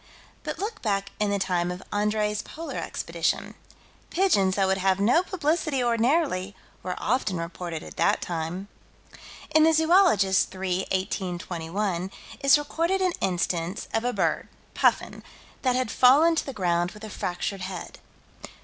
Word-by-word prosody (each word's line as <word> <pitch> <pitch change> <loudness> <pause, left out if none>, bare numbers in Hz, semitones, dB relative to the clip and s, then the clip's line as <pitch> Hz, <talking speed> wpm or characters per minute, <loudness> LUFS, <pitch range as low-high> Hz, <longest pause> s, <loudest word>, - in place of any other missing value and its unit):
But - - -5
look 425 +2 -4
back 200 -3 -1
in 210 -1 +1
the 200 - +1
time 180 -2 0
of 180 +1 -6
Andrée's 210 0 0
Polar 330 +1 -7
Expedition. - - -2 0.6
Pigeons 200 - +2
that 195 - +2
would 190 0 +1
have 190 0 +2
no 240 +12 +4
publicity 315 -6 0
ordinarily, 235 - +1 0.3
were 180 -1 -4
often 215 -6 0
reported 170 -1 -5
at - - -11
that - - +3
time. 175 +3 -4 0.9
In 315 - +6
the 320 0 +5
Zoologist, 320 - +4
3 185 0 -2
18 185 -1 -2
21, 175 +2 -3 0.3
is 275 +1 +6
recorded 335 +6 -1
an 370 -2 +1
instance 175 0 -1
of 225 - +1
a 245 - +1
bird - - 0 0.3
(puffin) - - +1 0.4
that 255 -2 +2
had 255 -3 0
fallen 290 +7 +6
to 320 - -1
the - - -3
ground 175 -3 0
with 210 - -13
a 215 - -6
fractured 185 +2 -3
head. 185 -1 -6
205 Hz, 150 wpm, -26 LUFS, 185-275 Hz, 0.9 s, In